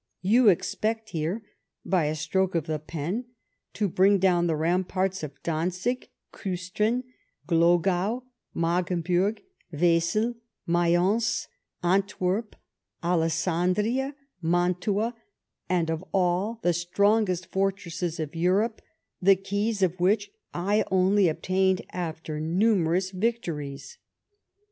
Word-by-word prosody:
You 225 +4 +5
expect 220 +4 -1
here, 170 +7 -2 0.4
by 180 -5 +2
a 150 +1 -1
stroke 180 +4 0
of 165 -3 0
the 155 -2 -2
pen, 165 - -4 0.5
to 210 - 0
bring 195 +3 +4
down 175 -2 +3
the 160 - +1
ramparts 185 +4 0
of 140 -2 -8
Dantzig, 180 +9 -2 0.2
Kiistrin, 200 +6 -1 0.4
Glogau, 175 +7 +2 0.3
Magdeburg, 175 +4 0 0.3
Wesel, 175 +8 +2 0.3
Mayence, 175 +6 +2 0.4
Antwerp, 195 +3 0 0.5
Alessandiia, 180 - +1 0.3
Mantua, 180 +6 +1 0.6
and 170 -3 +1
of 160 +2 -3
all 190 +5 +1
the 175 - +3
strongest 185 +1 +1
fortresses 180 -4 -2
of 155 -1 -4
Europe, 195 +7 +1 0.4
the 195 +1 +6
keys 200 +2 -1
of 185 0 +1
which 205 +3 +2 0.2
I 200 +5 +1
only 190 +1 +4
obtained 185 +3 +1
after 160 -3 -4
numerous 185 +1 +2
victories 185 - -3
185 Hz, 100 wpm, -26 LUFS, 170-205 Hz, 0.6 s, the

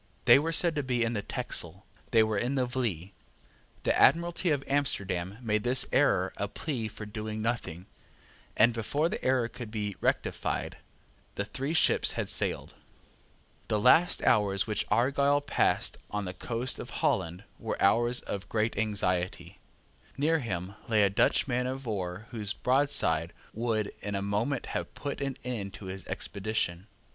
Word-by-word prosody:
They - - +8
were 160 +3 -1
said 165 +1 +5
to - - +2
be 125 -3 0
in 115 +1 0
the 105 - -1
Texel. 90 -1 -3 0.2
They 115 -2 +5
were 110 -2 0
in 125 +5 -1
the 130 -2 +2
Vlie. 110 -8 -3 0.7
The - - +2
Admiralty 170 +1 +3
of 145 -3 +1
Amsterdam 100 -9 -1
made 105 -2 0
this 125 +1 +5
error - - +3
a - - -1
plea 125 -8 -4
for 105 0 -8
doing 110 +1 -5
nothing; 110 -7 -3 0.7
and, 115 +2 +6
before 145 +8 0
the - - -5
error 130 -2 +2
could 120 -1 -8
be 105 -2 -3
rectified, - - -1 0.6
the 100 - -2
three 135 +8 -3
ships - - +4
had - - -3
sailed. - - 0 0.9
The 105 - +1
last 145 +10 +5
hours 100 -3 +3
which 105 -1 -1
Argyle 140 +3 +3
passed 145 - 0
on 105 -1 -3
the 90 - -5
coast 120 +5 -2
of - - -7 0.2
Holland 85 +2 0 0.2
were - - -4
hours 120 +5 +3
of 100 -1 -6
great 110 +1 0
anxiety. 90 -3 -1 0.6
Near 160 +3 +2
him 95 -6 -4 0.2
lay 110 -2 +4
a 100 - +3
Dutch 100 - +2
man 125 -1 0
of 135 +1 -5
war 95 -2 -4
whose 105 -3 0
broadside 125 - +2 0.2
would 110 -2 -1
in 100 -1 -3
a 100 - -2
moment 105 +7 -1
have - - -4
put 140 -1 -5
an 135 -1 -2
end 110 -6 -4
to 100 - -10
his 95 -1 -7
expedition. 100 -3 -2
110 Hz, 165 wpm, -29 LUFS, 100-130 Hz, 0.9 s, They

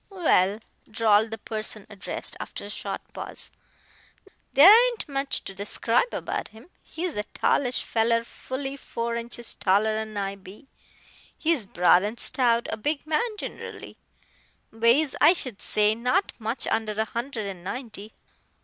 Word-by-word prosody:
"Well," 210 - +2 0.3
drawled 220 0 +3
the 225 - -5
person 215 -1 -5
addressed, 205 -3 -5
after - - -6
a 205 - -7
short - - -5
pause - - -3 1.0
"there 350 +10 +9
ain't 475 -7 -4
much 275 -1 -2
to 195 - -7
describe 210 - 0
about - - -3
him. 225 +11 -17
He's 335 -5 -5
a 210 - 0
tallish 250 -2 +1
feller 230 0 +1
fully 270 +3 -6
four 235 -3 -4
inches 235 0 -3
taller'n 215 +2 +1
I 195 0 -3
be. 195 +8 -14 0.7
He's 315 -9 0
broad 180 -1 +4
and 215 +4 -4
stout 235 -2 +2
a 220 - -3
big 290 +6 -2
man 420 +9 -1
ginerally. - - -8 0.8
Weighs, 235 +6 +3
I 345 - +8
should 255 - -1
say, 210 0 +3
not 250 - 0
much 225 +3 -2
under 220 -1 -1
a 220 +1 -1
hundred 235 -1 -4
and 190 -3 -7
ninety. 220 0 -7
230 Hz, 145 wpm, -26 LUFS, 210-275 Hz, 1.0 s, there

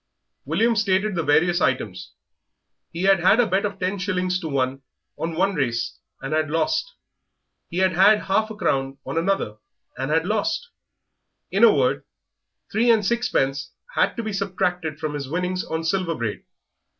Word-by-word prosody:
William 220 - +2
stated 205 -1 +1
the 170 - 0
various 170 +3 +3
items. 105 -7 -1 0.8
He 170 +2 -4
had 195 -1 +5
had 190 +6 +4
a 245 - +5
bet 195 +1 +1
of 200 -1 -3
ten 190 +2 -1
shillings 185 -1 -1
to 165 - -5
one 135 -2 -1 0.3
on 165 0 -4
one 195 +4 +2
race 120 -7 -2 0.2
and 135 +3 -4
had 155 -1 +1
lost; 320 - 0 0.7
he 170 - -5
had 190 0 +3
had 205 +4 +5
half 215 +3 +1
a 220 - -7
crown 135 -8 -1
on - - -5
another 165 - 0 0.4
and 135 +1 -2
had 160 +2 +2
lost; 220 - -1 0.8
in - - +2
a - - +9
word, - - +1 0.7
three 235 +2 +2
and 220 -3 +4
sixpence 145 - 0 0.2
had - - +1
to 230 - -2
be 215 -1 -4
subtracted 180 -5 -2
from 155 -2 -3
his 140 -2 -5
winnings 180 +3 -1
on 160 0 -3
Silver 170 0 0
Braid. 115 -5 -4
180 Hz, 170 wpm, -23 LUFS, 150-200 Hz, 0.8 s, a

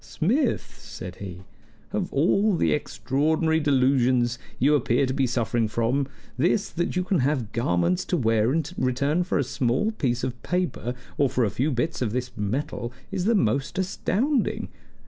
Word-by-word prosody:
"Smith," 225 - -1
said 90 0 -8
he, 95 -2 -8 0.5
"of - - -1
all 195 +8 +3
the - - +2
extraordinary 150 +6 +1
delusions 130 -4 +2 0.2
you 140 +4 +3
appear 125 -2 +2
to 130 - -2
be 135 -1 +1
suffering 115 -1 0
from, 120 +5 0 0.3
this, 185 +7 +2
that 175 +1 -2
you 180 - +1
can 185 -2 +1
have 130 -5 0
garments 90 -6 +1
to 180 - -1
wear 115 -3 +2
in 160 +3 +1 0.2
return 140 +7 +1
for 180 - -1
a 140 - +2
small 130 - 0
piece 125 - -1
of 125 -2 -3
paper, 160 -9 -2 0.2
or 140 -2 +4
for 125 -1 +1
a 105 - -1
few 135 +5 0
bits 150 +5 -1
of 110 -4 0
this 125 0 -2
metal, 120 +3 -3 0.2
is 190 -2 -2
the 230 +2 +3
most 140 - 0
astounding! 220 +8 0
135 Hz, 165 wpm, -25 LUFS, 120-165 Hz, 0.5 s, or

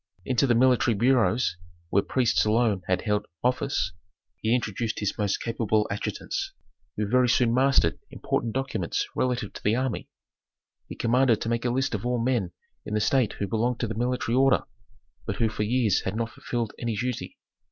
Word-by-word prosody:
Into 130 +2 +2
the 120 - +3
military 125 -1 +4
bureaus, 120 -3 +2 0.3
where 100 - +4
priests 120 +1 +2
alone 110 -2 +2
had 90 - 0
held 105 -1 0 0.2
office, 125 - 0 0.5
he 110 +2 +1
introduced 110 -1 -2
his 105 - -1
most 105 -2 0
capable 110 -2 0
adjutants, 100 - -3 0.4
who 105 - 0
very 125 +2 +3
soon 115 0 +3
mastered 130 -9 +3
important 115 - -2
documents 130 -10 -1
relative 125 -5 -1
to - - -9
the 105 +2 +2
army. 130 -2 -2 0.8
He - - -7
commanded 120 -1 +3
to 115 - -2
make 115 +1 -1
a - - +2
list 135 +2 0
of - - -2
all 125 0 0
men 115 -6 0 0.3
in 105 - -4
the - - +2
state 120 +1 +2
who 100 - -3
belonged 115 +4 0
to 120 - 0
the 110 - -3
military 120 0 -1
order, 135 +1 +4 0.6
but - - -1
who 115 - +1
for 105 - -5
years 110 -2 +2
had 95 - -3
not 115 0 -2
fulfilled 120 -3 -3
any 120 -2 -2
duty. 125 +2 -3
115 Hz, 180 wpm, -26 LUFS, 105-125 Hz, 0.8 s, military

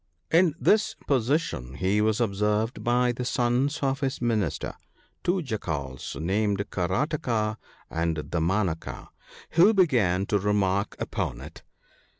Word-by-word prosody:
In 165 -2 +4
this 215 +1 +3
position 125 - 0
he 95 +5 +1
was 110 +1 +2
observed 105 +1 0
by 125 0 +3
the 120 +1 -4
sons 125 +3 0
of 135 0 +1
his 135 -2 -2
minister, 110 - -1 0.5
two 180 0 +1
jackals 75 - -4
named 100 +4 0
Karataka 110 - 0 0.3
and 80 0 -1
Damanaka, 85 +3 -2 0.4
who 190 +7 +5
began 110 - +3
to 105 0 +1
remark 100 -1 +1
upon - - -3
it. - - -10
110 Hz, 120 wpm, -26 LUFS, 95-135 Hz, 0.5 s, who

